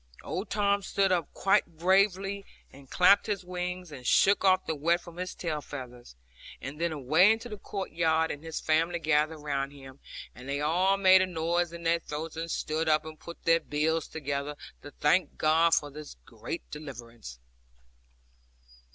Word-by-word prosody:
Old 190 +4 -4
Tom 200 -1 +1
stood 195 0 +1
up 175 -4 0
quite 175 -4 +1
bravely, 195 +2 +2 0.3
and 135 -1 -15
clapped 200 +4 +5
his 200 -3 -2
wings, 180 -1 -5
and 130 -4 -9
shook 200 +10 +4
off 185 -1 +4
the - - -1
wet 165 +4 +1
from 175 -1 -13
his 185 0 -5
tail 155 -4 -3
feathers; 125 - -9 0.4
and 145 +4 -7
then 170 -1 +1
away 155 +7 +4
into 225 +2 -2
the 210 -3 -8
court 195 -1 -5
yard, 160 -1 +1
and 145 - -7
his 160 -1 -5
family 165 +2 +1
gathered 155 -1 +1
around 140 -2 -2
him, 135 -1 -13 0.3
and 125 +2 -11
they 140 +1 -1
all 180 +6 +2
made 190 -1 +6
a 185 - +1
noise 170 0 -1
in 170 0 -9
their 165 0 +2
throats, 155 0 -6
and 165 +1 -4
stood 160 0 -1
up, 155 0 +2
and 155 -1 -9
put 170 - -11
their 165 0 +5
bills 155 +1 -1
together, 145 -1 -4 0.3
to 145 - -10
thank 150 +6 +1
God 165 +2 +4
for 145 -1 -1
this 150 +1 -10
great - - -7
deliverance. 120 - -9
165 Hz, 175 wpm, -29 LUFS, 150-180 Hz, 0.4 s, made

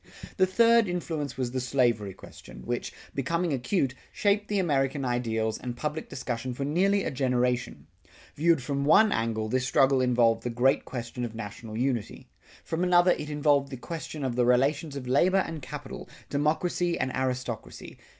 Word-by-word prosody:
The 185 -2 +4
third 230 +3 +4
influence 160 -6 -3
was 125 -2 -2
the 130 - -2
slavery 120 -6 0
question 60 0 -13
which, - - -3 0.2
becoming 170 +4 -1
acute, 135 +1 0 0.2
shaped 205 0 +1
the 205 - -1
American 140 -6 0
ideals 115 -3 -1
and 120 -1 -6
public 150 +3 -4
discussion 125 -1 -4
for 140 - -3
nearly 195 +7 +2
a - - -2
generation. 125 - -1 0.5
Viewed 160 -2 +2
from 140 +1 -2
one 210 +9 +5
angle, 115 - -1
this 125 +2 0
struggle 135 -1 +3
involved 120 -2 +3
the 125 - -3
great 125 +3 +2
question 120 0 -5
of 115 -2 -5
national 110 0 -7
unity. 125 -3 -2 0.3
From 165 +2 -2
another 180 0 +5
it 150 -3 -2
involved 145 -2 +2
the 130 - -6
question 160 +1 -6
of 130 -3 -1
the 125 - +2
relations 140 +5 +2
of 130 -3 -6
labor 185 +9 +3
and 160 -2 -6
capital, 140 +1 -8 0.2
democracy 170 +4 0
and 130 0 -1
aristocracy. 125 -3 -4
135 Hz, 165 wpm, -27 LUFS, 125-160 Hz, 0.5 s, one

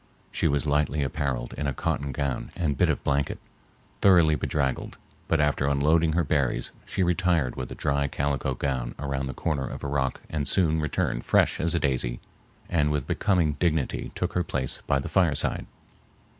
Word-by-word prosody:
She - - +1
was 70 +1 +1
lightly 75 0 +1
appareled 65 -2 -2
in 75 - -1
a 70 - -2
cotton 70 +2 -1
gown 70 -1 -2
and 75 -5 0
bit - - +3
of - - -1
blanket, 70 -1 0 0.6
thoroughly 85 -5 +6
bedraggled, 65 -1 -1 0.3
but 80 - +2
after 75 -2 +2
unloading 80 +3 +3
her 85 +1 +2
berries 70 -4 0 0.2
she 95 - 0
retired 90 -7 +1
with 65 - -5
a - - -5
dry 70 -1 0
calico 70 -2 -1
gown 65 -3 -2
around 70 -1 -2
the 65 - -5
corner 75 -5 -1
of - - -7
a - - -2
rock 70 -2 -1
and 75 -3 -2
soon 80 -1 +2
returned 70 -5 -1
fresh - - +3
as 85 +1 +2
a - - +2
daisy 60 -4 +1 0.5
and 75 -4 +2
with 75 -3 -1
becoming 90 -6 +2
dignity 80 -5 0
took - - -2
her 90 - +1
place 65 -6 -3
by 70 - +3
the 70 - -3
fireside. - - +1
70 Hz, 180 wpm, -26 LUFS, 65-80 Hz, 0.6 s, thoroughly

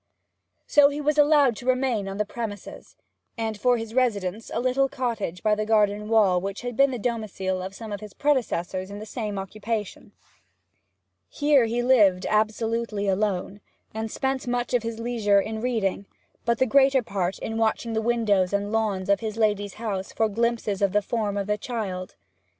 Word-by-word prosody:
So 290 -1 +6
he 290 +1 -4
was 300 0 +1
allowed 290 -5 +5
to 245 - -9
remain 255 -5 +1
on 195 0 -5
the 210 - 0
premises, 205 -3 -7 0.4
and 225 -1 -2
had 205 - -16
for 250 -1 +4
his 225 -1 -6
residence 215 -5 0
a - - -1
little 255 +2 +1
cottage 225 -10 -3
by 215 - +3
the 210 0 0
garden 210 -1 +1
wall 200 -5 +4
which 195 +1 -4
had 245 -1 -5
been 275 +3 +5
the 255 - -3
domicile 205 -5 -2
of 190 +1 -6
some 220 0 -8
of 205 - -4
his 210 -2 -11
predecessors 195 -10 0
in 200 - -7
the 215 - -7
same 210 -2 -4
occupation. 210 +2 -4 1.2
Here 290 -4 +3
he 235 +2 -1
lived 205 -8 +4
absolutely 215 0 0
alone, 195 0 -1 0.3
and 220 0 -3
spent 265 +2 -2
much 245 0 -1
of 245 - +3
his 230 0 -4
leisure 225 -4 +2
in 220 +2 -3
reading, 215 -5 -1 0.4
but 235 0 +2
the 260 - +3
greater 270 +1 +4
part 190 -3 -2
in 225 0 -4
watching 225 +1 0
the 220 - 0
windows 215 -5 +1
and 200 +1 -1
lawns 210 -4 0
of 200 0 +3
his 220 -1 -5
lady's 205 -3 0
house 205 -4 -4
for 220 - +1
glimpses 225 -2 -1
of 200 -2 +2
the 210 0 +2
form 205 -2 -2
of 200 - -1
the 210 +1 -1
child. 200 -6 -4
220 Hz, 185 wpm, -25 LUFS, 200-240 Hz, 1.2 s, So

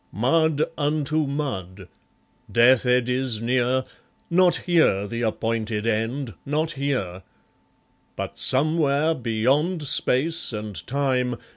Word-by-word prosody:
Mud 155 +6 +2 0.2
unto 150 +1 0
mud! 100 - -5 0.6
Death 125 +2 +4
eddies 125 -1 +1
near 125 +2 +1 0.5
Not 180 0 +4
here 160 - +3
the 115 +3 -5
appointed 110 -1 -2
End, 115 +3 -2
not 155 +3 -1
here! 130 - -3 0.9
But - - -6
somewhere, 150 +2 +2
beyond 135 +8 0
Space 140 +1 +1
and 105 -1 -5
Time. 130 -2 0
130 Hz, 100 wpm, -23 LUFS, 115-150 Hz, 0.9 s, Death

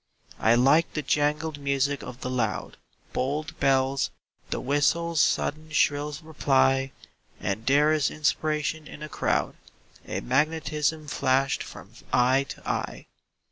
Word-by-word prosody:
I 115 +1 +4
like 140 +7 +4
the 155 - -1
jangled 150 +2 0
music 140 0 0
of 125 0 -9
the 125 - -3
loud 115 -6 -2 0.4
Bold 145 +4 -2
bells; 135 0 +2 0.4
the - - -2
whistle's 155 +4 +1
sudden 155 +1 0
shrill 145 -1 +1
reply; 135 -3 +2 0.5
And 100 +5 -3
there 145 +3 +5
is 150 -3 +2
inspiration 155 +1 -1
in 150 - -9
a 155 - -6
crowd - - -1 0.5
A - - -3
magnetism 155 +2 0
flashed 135 -1 +1
from - - -10 0.2
eye 130 +2 +3
to - - -9
eye. - - -3
145 Hz, 130 wpm, -26 LUFS, 135-155 Hz, 0.5 s, there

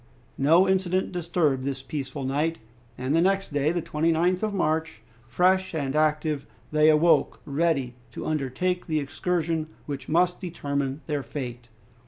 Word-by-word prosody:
No 165 +7 +5
incident 190 -1 +1
disturbed 170 -6 0
this 135 -1 -3
peaceful 140 -2 -5
night, 150 +5 0 0.4
and 130 +4 0
the 165 - +4
next 195 -2 +1
day, 145 +2 +2
the 175 -1 -2
29th 165 +4 +1
of 215 -1 0
March, 160 - -1 0.2
fresh 185 +7 +2
and 140 -2 -2
active 155 -1 +1 0.2
they 155 0 +5
awoke, 155 +2 +4
ready 140 -4 0 0.2
to - - -6
undertake 155 +5 -1
the 155 -2 +1
excursion 160 +2 -1 0.2
which 140 -2 -6
must 175 +2 +2
determine 140 -5 -3
their 150 -2 -1
fate. 120 -4 -6
155 Hz, 145 wpm, -26 LUFS, 140-175 Hz, 0.4 s, No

